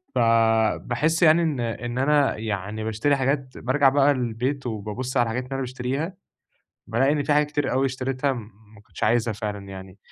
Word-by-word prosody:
فباحس 115 +6 +2
يعني 160 +1 +6
إن 155 -5 -1
إن 120 +1 -3
أنا 145 +1 +2
يعني 105 0 -4
باشتري 110 +6 +1
حاجات، 135 -1 -1
بارجع 135 +2 +3
بقى 140 +1 +4
البيت 130 +2 -2
وبابص 115 +4 -4
على 120 - +5
الحاجات 120 +2 -2
اللي 130 - -15
أنا 135 - -2
باشتريها، 130 +6 -3 0.7
بالاقي 135 +5 +2
إن 145 -1 0
في 150 - +1
حاجة 150 +1 +4
كتير 145 -1 -2
أوي 135 +2 +2
اشتريتها 130 +1 -1
ما 110 -2 -12
كنتش - - -7
عايزها 115 -1 +2
فعلًا 105 -2 -5
يعني. 95 0 -10
125 Hz, 170 wpm, -24 LUFS, 110-140 Hz, 0.7 s, يعني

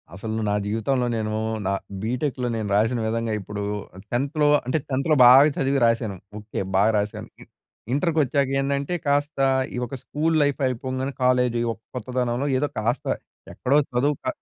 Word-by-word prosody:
అసలు 110 +3 -4
నా 105 - +1
జీవితంలో 115 +5 0
నేను 110 -1 -2 0.3
నా 100 - +1 0.3
బీటెక్‌లో 125 +2 -1
నేను 110 -2 -3
రాసిన 115 +4 +2
విధంగా 115 0 -1
ఇప్పుడు 100 +1 -6 0.5
10థ్‌లో 140 +5 +1 0.2
అంటే 130 +5 0
10థ్‌లో 140 +3 +1
బాగా 135 +5 +8
చదివి 135 +1 +1
రాసాను. 115 -3 +1 0.2
ఓకే. 105 +1 -6 0.2
బాగా 100 +3 +4
రాసాను. 105 0 -3
ఇ - - -10 0.5
ఇంటర్‌‌కి 160 +2 +1
వచ్చాక 140 0 0
ఏండంటే, 140 +4 -1
కాస్త 145 +1 0 0.4
ఈ - - -3
ఒక 135 - -6
స్కూల్ 160 +2 0
లైఫ్ 145 0 0
అయిపోగానే 130 +2 -3
కాలేజ్ 125 -1 +3 0.4
కొత్తదనంలో 125 +2 -1
ఏదో 145 +2 0
కాస్త 120 +4 -1 0.5
ఎక్కడో 135 +3 +1 0.2
చదువు 140 +4 +2
క - - -6
125 Hz, 150 wpm, -24 LUFS, 110-140 Hz, 0.5 s, బాగా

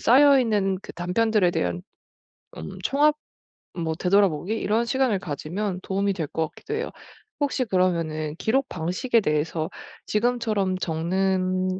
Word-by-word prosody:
쌓여 275 +2 +6
있는 205 -5 +1
그 - - -9
단편들에 190 +2 +2
대한 90 - -2 0.8
음 80 - -7
총합? 295 +2 +3 0.6
뭐 160 -2 -2
되돌아보기? 185 0 +2
이런 225 +1 +1
시간을 260 -4 +1
가지면 180 +4 -3
도움이 200 +1 0
될 165 -5 -3
것 160 +2 -1
같기도 435 - -6
해요. 455 +2 -3 0.5
혹시 280 -3 0
그러면은 165 -6 0
기록 260 +7 +1
방식에 185 +8 0
대해서 155 0 -1 0.4
지금처럼 215 -4 0
적는 185 +2 0
190 Hz, 295 characters per minute, -25 LUFS, 170-225 Hz, 0.8 s, 쌓여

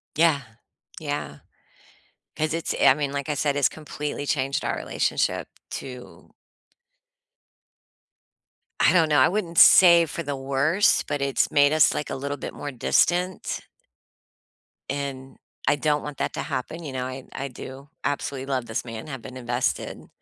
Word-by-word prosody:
Yeah, 160 -3 +4 0.6
yeah. - - -4 1.0
'Cause 155 0 0
it's 165 0 -2
I - - +7
mean, 140 0 -2
like 140 -1 -3
I - - +1
said, 145 0 0
it's 145 - +4
completely 150 -2 -5
changed 135 -1 0
our - - -1
relationship, - - -1 0.2
too. 125 -2 -9 2.5
I - - +5
don't 165 -3 +4
know, 150 -2 +4
I 130 - +6
wouldn't 175 -3 -3
say 170 -2 +8
for 165 - -5
the 145 -1 -3
worse, 140 +8 +2
but 145 - -3
it's 140 -1 +1
made 145 0 +4
us, 155 -1 +5
like, 150 - -3
a - - -3
little 140 +2 -4
bit - - -6
more 145 - -6
distant? 175 +8 +1 1.3
And, 135 -1 -5 0.3
I 145 - +4
don't 150 0 +1
want 150 -2 -7
that - - -1
to - - -3
happen, 165 +6 -4
you 145 -4 -6
know, 130 -1 -2
I 130 0 -7
I 140 - -4
do 135 +2 -10
absolutely 140 -2 -2
love 130 -3 -2
this 110 - -3
man, 115 +1 -7
I - - -7
have 130 -4 -7
been 130 - -9
invested 125 0 -2
140 Hz, 160 wpm, -25 LUFS, 130-155 Hz, 2.5 s, say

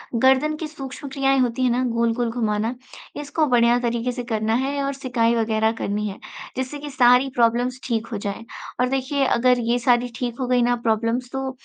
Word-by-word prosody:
गर्दन 265 +5 +3
की 315 - -4
सूक्ष्म 280 -2 -8
क्रियाएँ 270 0 +1
होती 250 0 0
हैं 255 - +3
ना, 250 +2 +1
गोल-गोल 235 0 0
घुमाना, 225 0 -1 0.5
इसको 295 +2 0
बढ़िया 240 -1 +4
तरीके 235 0 -1
से 245 0 -5
करना 220 0 0
है 280 0 -2
और 275 0 -1
सिकाई 245 -4 0
वगैरह 220 -1 +1
करनी 210 +1 -1
है, 195 - -9 0.4
जिससे 260 +3 -3
कि 295 0 -7
सारी 250 0 +4
प्रॉब्लम्स 245 +2 +1
ठीक 230 -2 -1
हो 220 - -2
जाएँ। 205 +2 -5 0.3
और 250 0 +2
देखिए, 270 +1 0
अगर 250 0 +3
ये 245 - +2
सारी 245 0 +2
ठीक 240 -1 -4
हो 255 - -1
गई 250 0 +3
ना 245 0 +2
प्रॉब्लम्स, 230 +3 0
तो 265 0 -3
245 Hz, 195 wpm, -22 LUFS, 230-265 Hz, 0.5 s, बढ़िया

